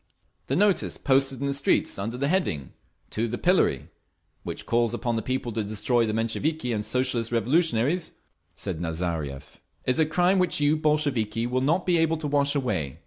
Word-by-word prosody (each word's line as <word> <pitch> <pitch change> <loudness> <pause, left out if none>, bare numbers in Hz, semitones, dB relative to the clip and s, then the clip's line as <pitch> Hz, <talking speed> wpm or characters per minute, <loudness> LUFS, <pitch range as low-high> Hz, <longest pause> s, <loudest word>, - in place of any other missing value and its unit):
"The 135 - 0
notice 200 +2 +2
posted 135 -1 +1
in - - -1
the 140 - 0
streets 140 -7 +1
under 115 +5 -3
the 140 +2 0
heading 145 - -1 0.4
'To 115 +2 -1
the 120 +2 -3
Pillory,' 175 - +2 0.5
which - - -6
calls 120 0 +1
upon 120 -1 -2
the 110 - -1
people 130 +1 -2
to 110 0 -2
destroy 110 +3 +1
the - - 0
Mensheviki 120 +4 -1
and 105 -1 -2
Socialist 120 0 0
Revolutionaries," 145 +5 +1 0.4
said 90 -5 -5
Nazariev, 80 -4 -4 0.3
"is 130 +4 +1
a 155 - +4
crime 180 +4 +2
which 180 -4 +2
you, 145 +1 +3
Bolsheviki, 140 -8 0
will 125 +1 0
not 165 +7 +1
be 175 -2 +3
able 165 0 +2
to 155 - -6
wash 145 0 +2
away. 80 - -1
130 Hz, 180 wpm, -26 LUFS, 110-155 Hz, 0.5 s, a